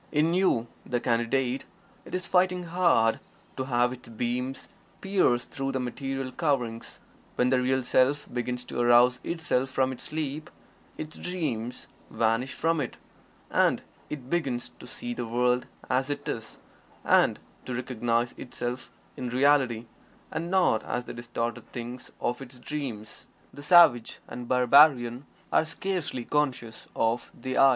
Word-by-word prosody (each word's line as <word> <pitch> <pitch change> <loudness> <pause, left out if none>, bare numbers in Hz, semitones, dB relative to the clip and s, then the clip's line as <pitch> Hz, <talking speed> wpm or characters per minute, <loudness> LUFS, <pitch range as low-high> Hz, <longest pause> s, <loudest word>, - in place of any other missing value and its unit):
In 160 +2 +2
you, 180 -11 +3 0.2
the 120 - -1
Candidate, 120 +3 0 0.4
it - - -5
is 185 -1 -2
fighting 180 0 +2
hard 165 -10 +3 0.4
to 130 - -3
have 125 -1 +2
its 125 -2 -12
beams 125 +3 -3 0.3
pierce 190 -11 +2
through 135 0 -3
the 130 - 0
material 135 +1 -3
coverings 125 -9 -1 0.4
When 125 +1 +2
the 130 -1 +3
Real 130 +1 +1
Self 130 +4 +2
begins 125 0 -2
to 125 - -5
arouse 120 +1 +5
itself 160 -6 0
from 130 0 +1
its 130 - -6
sleep, 155 +1 -4 0.5
its 155 0 -6
dreams 125 -10 -3 0.2
vanish 115 +3 0
from 165 -1 +1
it, 125 - -4 0.5
and - - +3 0.3
it 140 -4 -6
begins 135 -7 -1
to - - -11
see 245 -1 -5
the 120 - -4
world 125 +2 +1 0.2
as 130 +2 +1
it 145 0 -4
is, 110 -1 -4 0.5
and - - +4 0.3
to 125 - -3
recognize 120 -1 0
itself 125 +1 -5 0.3
in 125 -1 -4
Reality 130 -3 +3 0.5
and 170 +1 -3
not 180 - +3
as 125 0 -3
the - - -7
distorted 120 0 -4
thing 120 +1 -6 0.2
of 125 +2 -2
its 130 -1 -10
dreams. 125 -5 -6 0.3
The 145 - -10
savage 150 -7 +6
and 120 -1 -7
barbarian 125 0 +5 0.3
are - - +5
scarcely 165 -6 -3
conscious 130 -6 -1
of 115 +1 0
the 130 +1 -2
"I." 135 - +8
130 Hz, 145 wpm, -28 LUFS, 120-150 Hz, 0.5 s, I